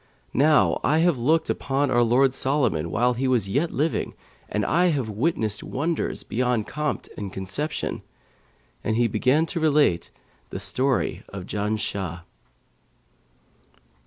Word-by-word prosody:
Now 150 +2 +4
I 155 - +3
have 165 -5 +3
looked 160 +6 +2
upon 135 0 0
our 120 -1 +4
lord 125 +3 +4
Solomon 130 - 0
while 120 +10 +2
he 130 +2 -1
was 120 -6 +2
yet 140 +12 0
living 155 +1 -1 0.3
and 105 -1 -1
I 175 - +3
have 140 -9 0
witnessed 110 -3 -1
wonders 160 +5 -2
beyond 125 -2 0
compt 150 0 -3
and 100 -2 -5
conception.' 100 - -3 0.8
And 110 - 0
he 120 +1 +3
began 130 +8 +2
to 170 +1 -4
relate 150 - +2 0.4
The - - -5
Story 130 0 -1
of 95 -2 -7
Janshah. 100 -5 -3
130 Hz, 130 wpm, -24 LUFS, 105-150 Hz, 0.8 s, Now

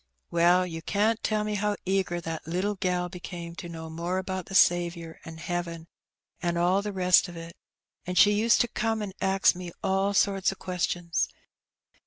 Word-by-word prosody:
Well, 175 +2 +4
yon 165 -2 -6
can't 215 +3 +1
tell 215 -1 0
how 210 +1 0
e^^r 185 -2 0
that 165 -1 -5
httle 185 +5 -2
gal 180 -2 0
became 175 -1 -7
to 175 - -7
know 160 -1 -7
more 170 +3 -3
about 190 -1 -3
the 195 - -6
Savionr, 170 -2 +3
an* 160 0 -8
hearen, 170 -1 -4 0.6
an' 175 -1 0
all 180 +3 +3
the 210 0 -4
rest 185 -1 +4
o' - - -9
it. 165 0 -9 0.5
An' 180 - -3
she 205 +3 +7
used 215 +2 +4
to 240 - +2
come 225 -2 -1
an' 195 -2 -6
ax 195 0 +4
me 180 -1 -7
all 195 +1 +1
sorts 195 -1 +2
o' - - -7
questions. 175 -2 -1
180 Hz, 180 wpm, -27 LUFS, 170-195 Hz, 0.6 s, she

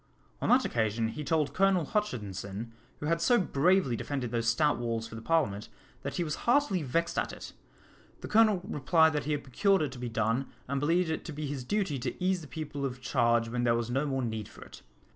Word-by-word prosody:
On - - 0
that 255 +1 +5
occasion 110 0 0
he 150 +6 -5
told 150 -1 0
Colonel 190 -3 +3
Hutchinson, 110 - -3 0.3
who - - -5
had 165 +2 +1
so 240 +8 +4
bravely 180 -5 +2
defended 125 -1 -3
those 115 -1 -1
stout 145 +3 +2
walls 115 -1 -2
for - - -13
the 115 - -7
Parliament, 120 -9 0 0.3
that - - -4
he 175 - 0
was 150 -3 -3
heartily 240 -9 +3
vexed 165 +5 0
at - - -2
it. - - -9 0.7
The - - -6
Colonel 215 -4 +4
replied 160 +2 +3
that 150 -1 -1
he 150 - 0
had 145 - -2
procured 190 - +2
it 145 - -2
to 125 - -9
be 120 -1 -4
done, 115 +4 0 0.2
and 140 +1 -1
believed 165 +3 +2
it 160 - -3
to 160 - -5
be 150 0 -4
his 140 -2 -4
duty 185 -3 -1
to - - -3
ease 185 -1 +1
the 155 - -10
people 150 -2 -5
of 125 -2 -3
charge 120 -3 +2
when 120 +1 -1
there 115 -1 +3
was 120 0 -2
no 135 +4 0
more 135 -2 -1
need 110 -3 -3
for - - -12
it. - - -13
140 Hz, 225 wpm, -30 LUFS, 120-165 Hz, 0.7 s, that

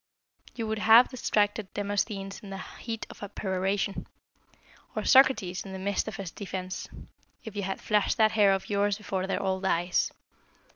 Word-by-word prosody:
You 230 - -3
would 220 0 -2
have 225 +3 +7
distracted 210 -5 0
Demosthenes 200 -1 -2
in 200 - -11
the 195 - -5
heat 225 +3 -6
of - - -14
a 205 - -5
peroration, 195 0 -2 0.9
or - - -1
Socrates 255 -9 +4
in 195 - -9
the - - -5
midst 200 +2 -1
of 220 - -4
his 190 -4 -6
defence, 185 -1 -5 0.5
if 220 -3 -9
you 205 - -2
had 195 0 -3
flashed 210 -1 +1
that 220 -1 +5
hair 210 -3 +5
of 195 0 -1
yours 205 0 +1
before 190 -3 -3
their 195 - -1
old 190 0 -1
eyes. 175 -1 +1
200 Hz, 175 wpm, -28 LUFS, 190-215 Hz, 0.9 s, have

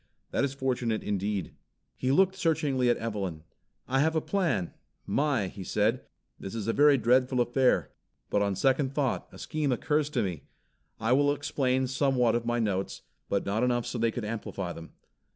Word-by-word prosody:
That - - +1
is 140 -1 -1
fortunate 125 -4 -1
indeed." 100 -1 -2 0.4
He 130 - 0
looked 190 +6 +4
searchingly 145 -8 +1
at 120 - +3
Evelyn. 100 -8 -4 0.4
"I 135 +1 +1
have 160 +3 +2
a - - +4
plan, 155 - -1 0.3
my," 140 -8 +1
he 95 +1 -8
said. 110 +7 +1 0.4
"This 95 - -7
is 110 -2 -4
a 115 - +1
very 145 -1 +6
dreadful 125 +2 +3
affair, 125 +2 +2 0.4
but 100 - +2
on 100 -1 +1
second 135 +4 +1
thought 140 -4 0
a - - -12
scheme 150 -3 -2
occurs 150 +4 +1
to 125 -6 0
me. 90 -6 -4 0.5
I 115 +2 0
will 145 +2 +4
explain 130 -2 0
somewhat 130 -2 +2
of 120 0 -1
my 120 0 +1
notes, 100 -4 -2 0.3
but 100 - 0
not 100 +3 0
enough 120 -1 +1
so 120 - -4
they 115 0 +2
could 115 0 -4
amplify 105 -5 -4
them. 80 0 -11
125 Hz, 180 wpm, -28 LUFS, 105-140 Hz, 0.5 s, very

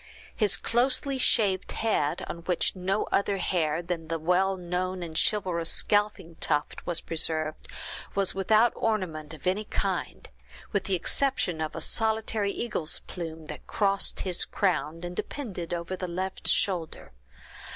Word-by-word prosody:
His 205 -5 +3
closely 260 +4 +2
shaved 200 -7 +3
head, 180 -10 0
on 170 - -5
which 180 +1 +1
no 190 +3 0
other 200 0 +2
hair 170 -3 0
than 170 -2 -3
the 165 +1 -1
well 180 +4 +2
known 180 +1 -2
and 160 -2 -7
chivalrous 180 -4 +1
scalping 205 -5 +1
tuft 150 -1 0
was 175 -2 0
preserved, 155 -1 -1 0.5
was 195 -1 +2
without 215 +5 +4
ornament 175 -9 -1
of 155 - -15
any 195 +4 +1
kind, - - -2 0.4
with 200 - 0
the 195 - +2
exception 180 -3 +1
of 155 -1 -3
a 165 - -4
solitary 220 0 +1
eagle's 190 -10 0
plume, 165 -3 -7
that 150 -1 -9
crossed 200 -1 +1
his 180 -3 +1
crown, 165 -4 0
and 175 0 -5
depended 190 - -5
over 175 +1 -2
the 185 0 -4
left 185 +2 -3
shoulder. 175 - 0
185 Hz, 145 wpm, -28 LUFS, 165-205 Hz, 0.5 s, without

